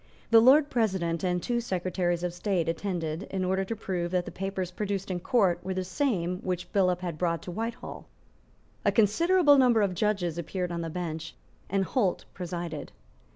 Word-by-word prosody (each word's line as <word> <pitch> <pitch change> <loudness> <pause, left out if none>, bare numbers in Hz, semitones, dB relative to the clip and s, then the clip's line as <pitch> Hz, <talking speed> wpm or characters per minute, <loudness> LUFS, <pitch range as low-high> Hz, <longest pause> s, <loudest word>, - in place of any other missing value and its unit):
The 225 - +9
Lord 280 +5 +6
President 190 -8 0
and 180 -1 +1
the - - -8
two 240 -1 0
Secretaries 180 -4 -1
of 175 -1 -1
State 175 -2 -1
attended 165 -1 -2
in 190 -1 -1
order 190 +1 +1
to 225 +4 -4
prove 180 -5 -3
that 180 0 0
the - - -7
papers 190 -1 -3
produced 195 0 -3
in 180 - -2
Court 180 -4 +2
were 190 +1 -3
the 185 - -1
same 185 - -1
which 180 -1 -4
Billop 180 -3 +2
had 175 -4 -4
brought 170 -2 0
to 180 - -6
Whitehall. 225 +5 -5 0.8
A - - +3
considerable 290 - +4
number 240 -4 +5
of 195 -2 0
judges 180 -4 0
appeared 180 +2 -3
on 170 0 -3
the 165 - -3
bench; 165 -1 -5 0.3
and 195 0 +1
Holt 205 -7 0
presided. 170 -3 -5
185 Hz, 185 wpm, -28 LUFS, 175-210 Hz, 0.8 s, The